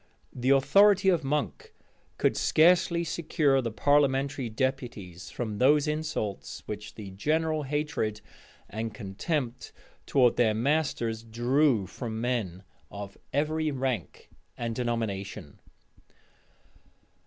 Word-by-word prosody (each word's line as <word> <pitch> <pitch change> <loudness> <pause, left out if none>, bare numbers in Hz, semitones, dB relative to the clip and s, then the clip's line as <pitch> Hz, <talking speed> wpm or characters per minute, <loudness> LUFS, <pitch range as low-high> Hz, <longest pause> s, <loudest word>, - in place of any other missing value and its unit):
The 125 +1 -1
authority 190 +9 +5
of 170 -4 +2
Monk 150 - -3 0.4
could - - +2
scarcely 170 +1 +4
secure 155 -4 +1
the 120 - -2
parliamentary 135 +2 +1
deputies 110 -8 -3
from 110 -4 -4
those 145 +3 +4
insults 150 -9 -3
which 105 0 -7
the 100 -3 -8
general 155 +9 0
hatred 145 -7 -2 0.5
and 110 0 -5
contempt 120 - -3 0.4
towards 125 -3 +3
their 110 -3 +3
masters 120 -3 0
drew 120 0 +2
from 110 +3 -6
men 110 -7 -2 0.3
of 100 -1 -8 0.2
every 155 +2 0
rank 130 - -3 0.3
and 115 -1 -3
denomination. 110 - -3
130 Hz, 105 wpm, -28 LUFS, 110-150 Hz, 0.5 s, authority